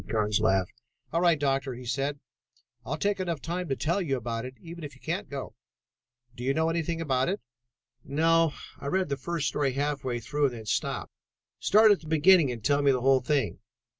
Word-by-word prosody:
Carnes 105 -2 +1
laughed. 95 -1 +1 0.4
"All 165 - +2
right, 170 -3 +4
Doctor," 135 -2 0
he 125 +1 -9
said, 140 +4 -2 0.6
"I'll - - -3
take 205 -1 0
enough 170 -4 -2
time 175 +2 -4
to 135 - +1
tell 170 +8 0
you 140 -7 0
about 115 -1 -4
it 130 0 -8
even 170 0 -9
if 145 - -7
you - - -19
can't - - -3
go. - - -6 0.8
Do 125 - -7
you 135 +2 +1
know 160 0 +2
anything 165 0 -1
about 135 -3 +1
it?" 195 - -1 0.6
"No. 165 +1 +3 0.3
I 140 - -6
read 185 +2 0
the 140 - 0
first 160 +3 -2
story 140 -3 0
half 145 0 -1
way 125 -2 -2
through 145 +6 0
and 130 -3 0
then 110 -2 -9
stopped. - - -2 0.5
Start 215 +1 +6
at 205 - +4
the 155 - -12
beginning 160 -1 +5
and 115 -3 -7
tell 145 +2 +3
me 140 - +4
the 130 -2 0
whole 135 0 +4
thing." 140 +1 0
145 Hz, 210 wpm, -28 LUFS, 130-165 Hz, 0.8 s, Start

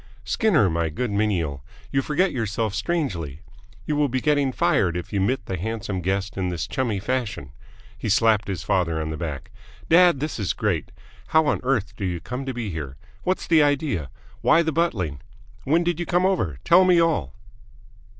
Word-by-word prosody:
"Skinner, 150 - +3
my 85 -1 0
good 115 +9 -3
menial, 90 -10 -1 0.3
you 135 - +2
forget 165 +7 +1
yourself 110 -3 -2
strangely! 100 - -2 0.4
You 150 - -1
will 145 -1 +2
be 130 +1 0
getting 145 -2 +2
fired 90 -7 +1
if 90 +4 -7
you 100 - +1
mitt 110 +2 0
the 95 - -3
handsome 105 -1 -3
guest 95 +3 -2
in 95 -1 -1
this 90 -1 -3
chummy 105 +4 -1
fashion!" 105 - -3 0.5
He - - -3
slapped 110 0 +3
his 95 -3 -3
father 85 -4 0
on 80 0 -3
the - - -3
back. 75 -5 -5 0.4
"Dad, 175 -3 +6
this 150 -3 -3
is 100 - 0
great! - - -1 0.4
How 160 0 +4
on - - +1
earth 115 -6 -1
do 105 - -6
you 90 -2 -1
come 125 +9 -6
to - - -1
be 115 -5 -3
here? 75 -4 -6 0.2
What's 185 +1 -1
the 165 -3 +5
idea? 140 - 0 0.3
Why 170 - +5
the 160 - 0
buttling? 100 - -1 0.4
When 165 +5 +3
did 175 -1 -1
you 175 - -3
come 180 +1 +2
over? 135 - 0
Tell 175 +2 +6
me 180 -2 +5
all!" 155 - +1
110 Hz, 190 wpm, -24 LUFS, 90-150 Hz, 0.5 s, Dad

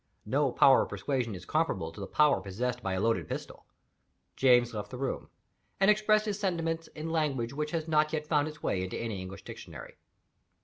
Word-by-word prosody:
No - - +1
power - - +6
of - - -3
persuasion 125 -7 -2
is 90 - -9
comparable 95 - 0
to 80 - -12
the 100 - -5
power 150 -9 +3
possessed 120 +6 -3
by 95 -3 -2
a 95 - -1
loaded 115 +2 +1
pistol. - - -7 0.7
James 120 -2 +4
left 105 -1 -5
the 125 - -7
room; 135 +1 -3 0.5
and 195 +2 +6
expressed 215 0 +3
his 210 -1 -2
sentiments 165 -4 -1
in 155 +1 -4
language 140 -7 0
which 150 +1 -2
has 160 0 -3
not 155 -1 +3
yet 155 -1 -2
found 150 -1 +2
its 150 -1 -9
way 95 - 0
into 95 - -4
any 110 -5 -4
English 95 +1 -8
Dictionary. - - -10
140 Hz, 195 wpm, -30 LUFS, 110-160 Hz, 0.7 s, power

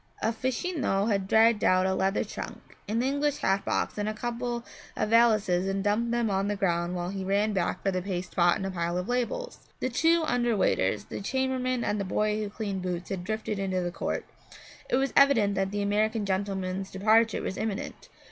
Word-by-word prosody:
A 225 - +2
fachino 255 - -1
had 195 -2 0
dragged 220 +1 +4
out 185 0 +4
a 190 - +1
leather 195 +1 +1
trunk, - - -8
an 230 +3 +1
English 285 +2 0
hat 195 +1 +1
box - - -1
and 205 +1 0
a 215 - -4
couple 240 +1 -3 0.3
of - - 0
valises 215 -6 +4
and 195 0 -1
dumped 210 +3 +1
them 235 -1 +1
on 195 +1 0
the 205 - 0
ground 175 -2 0
while 175 0 -3
he 195 0 -4
ran 200 +3 +1
back 185 -3 -1
for 195 - +2
the 185 -1 -1
paste 180 -1 -4
pot 175 -1 +4
and 190 - -4
a 195 - -2
pile 170 -1 -2
of 180 - -3
labels. 250 - -2 0.2
The 255 - -1
two 325 +6 +3
under 240 -5 +1
waiters, 100 - +1
the - - -6
chambermaid 255 +1 -1
and 210 - -1
the - - 0
boy 210 +2 0
who 210 -1 -3
cleaned 200 -3 -4
boots 180 -1 -4
had 185 -2 -3
drifted 215 +1 -3
into 190 -2 -1
the 175 0 -2
court. - - -3 0.6
It - - +2
was 270 +1 +1
evident 255 -8 +5
that 195 -1 0
the 205 +1 -2
American 210 +1 +1
gentleman's 190 -1 -2
departure 220 +3 +3
was 190 - -3
imminent. 215 -1 -4
205 Hz, 205 wpm, -28 LUFS, 190-235 Hz, 0.6 s, evident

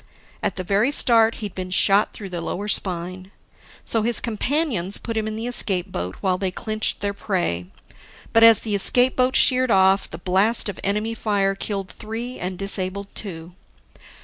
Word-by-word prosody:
At - - -2
the 185 - -4
very 205 +8 +1
start 230 -5 +5
he'd 200 - -7
been 185 -1 -6
shot 195 +3 +4
through 200 -3 -9
the 175 -2 -5
lower 200 +5 -4
spine. 185 -1 -2 0.6
So, 225 - +4
his 235 +1 +1
companions 230 - -1
put 230 - -6
him 220 -1 -1
in 215 - -4
the 225 +1 -5
escape 195 -6 0
boat 90 - -4
while 185 -2 0
they 190 - 0
clinched 215 +3 -2
their 200 0 -2
prey. 175 - -2 0.7
But 225 - +5
as 230 -1 +7
the 215 - -3
escape 245 +6 +3
boat 255 0 +1
sheered 255 -1 +4
off, 190 -1 +3
the 160 - -7
blast 195 +6 +1
of 195 - -7
enemy 210 +3 -1
fire 200 -3 0
killed 195 -1 -5
three 230 +3 -7
and 180 0 -4
disabled 195 0 -3
two. 170 -4 -8
200 Hz, 175 wpm, -22 LUFS, 185-225 Hz, 0.7 s, as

